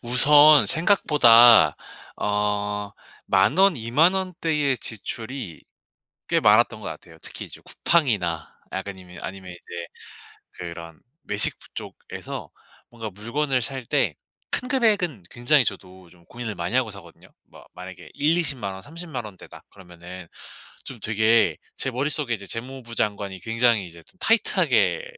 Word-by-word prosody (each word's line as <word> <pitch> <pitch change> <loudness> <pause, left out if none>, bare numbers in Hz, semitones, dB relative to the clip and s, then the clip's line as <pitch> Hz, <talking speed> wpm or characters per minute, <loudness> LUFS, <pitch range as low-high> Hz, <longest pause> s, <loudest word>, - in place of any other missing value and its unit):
우선 145 +5 +6
생각보다 120 - +6 0.4
어 105 0 -1 0.4
10,000 95 - +4
원, 195 -5 +5
20,000 140 +11 +3
원대의 160 -7 -1
지출이 110 - -5 0.7
꽤 - - +2
많았던 - - +4
것 - - -8
같아요. - - -9
특히 - - -6
이제 - - -10
쿠팡이나 105 - 0 0.2
약간 95 0 -5
이면 90 -1 -13
아니면 95 -1 -7
이제 90 - -13 0.9
그런 85 -2 -9 0.3
외식부 100 - -2
쪽에서 - - -8 0.4
뭔가 115 -2 -7
물건을 125 +7 -1
살 130 +1 -6
때 - - 0 0.4
큰 250 - -2
금액은 205 - +1
굉장히 125 +4 +3
저도 95 -2 -6
좀 85 -1 -22
고민을 115 +1 -6
많이 85 +5 -4
하고 130 -3 +2
사거든요? 90 -5 -14 0.2
뭐 - - -16
만약에 90 +1 -10
100,000-200,000 145 - 0
원, 95 - -9
300,000 160 - -7
원대다 100 -3 -13
그러면은 90 -1 -12 0.6
좀 - - -9
되게 110 +1 +3 0.2
제 135 - -3
머릿속에 140 0 -1
이제 100 -2 -11
재무부 120 +2 -8
장관이 100 -3 -2
굉장히 115 -2 +1
이제 85 0 -14 0.2
타이트하게 140 - +2
115 Hz, 270 characters per minute, -24 LUFS, 95-145 Hz, 0.9 s, 우선